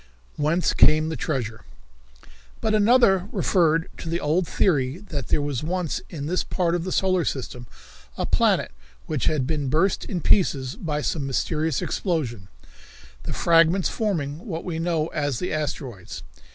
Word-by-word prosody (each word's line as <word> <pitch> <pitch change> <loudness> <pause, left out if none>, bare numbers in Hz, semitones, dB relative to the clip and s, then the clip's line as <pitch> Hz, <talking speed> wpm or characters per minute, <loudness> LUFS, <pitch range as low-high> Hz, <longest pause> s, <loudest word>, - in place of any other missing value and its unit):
Whence 155 +4 +1
Came 155 +1 +5
the 160 - -3
Treasure? 120 -9 -3 1.0
But 220 - 0
another 210 -3 +4
referred 165 -3 +2
to 165 - -6
the 170 +1 -1
old 165 +4 +1
theory 140 -6 +1
that 170 - -6
there 145 - +1
was 145 -4 -2
once 175 0 -2
in 145 -4 -6
this 180 +4 0
part 175 -3 0
of 175 -1 -1
the 185 - -3
solar 185 -2 +2
system 125 -4 -4 0.5
a - - -1
planet - - +2 0.3
which 150 -7 -2
had 150 -5 +1
been 145 -2 -1
burst 165 +8 +2
in 180 - -3
pieces 140 -7 +2
by 150 -3 -3
some 145 -4 -1
mysterious 155 +2 -1
explosion, 125 - -2 0.8
the - - -4
fragments 170 +2 +4
forming 160 -9 -2
what 165 -4 -4
we 165 -3 -3
know 165 -2 0
as 145 -5 -1
the 180 - -3
asteroids. 125 - -5
160 Hz, 155 wpm, -24 LUFS, 145-180 Hz, 1.0 s, Came